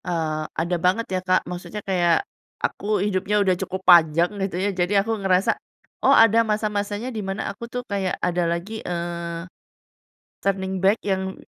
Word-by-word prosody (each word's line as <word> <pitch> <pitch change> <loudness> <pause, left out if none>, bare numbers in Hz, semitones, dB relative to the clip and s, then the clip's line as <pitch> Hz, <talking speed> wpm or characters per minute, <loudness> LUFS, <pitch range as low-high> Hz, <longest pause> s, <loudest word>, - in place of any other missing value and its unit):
Eee, 160 -3 -1
ada 170 +2 0
banget 190 +6 +2
ya, 185 - +1
Kak, 185 0 +2
maksudnya 180 +4 -6
kayak 175 -3 +2 0.4
aku - - -4 0.2
hidupnya 205 +1 0
udah 190 -2 +3
cukup 190 0 -4
panjang 170 0 +6
gitu 195 -2 -2
ya 195 +2 0
jadi 180 +2 0
aku 225 - 0
ngerasa, 190 0 +3 0.5
"Oh - - +7
ada 225 0 +6
masa-masanya 210 +1 -2
di 220 - -3
mana 195 0 -3
aku 200 - -12
tuh 250 0 -3
kayak 195 -4 -2
ada 180 0 +1
lagi, 185 +6 -3
eee, 170 -1 -4 1.0
turning 190 -1 -1
back 195 +3 +4
yang 190 -1 -1
190 Hz, 160 wpm, -23 LUFS, 175-205 Hz, 1.0 s, Oh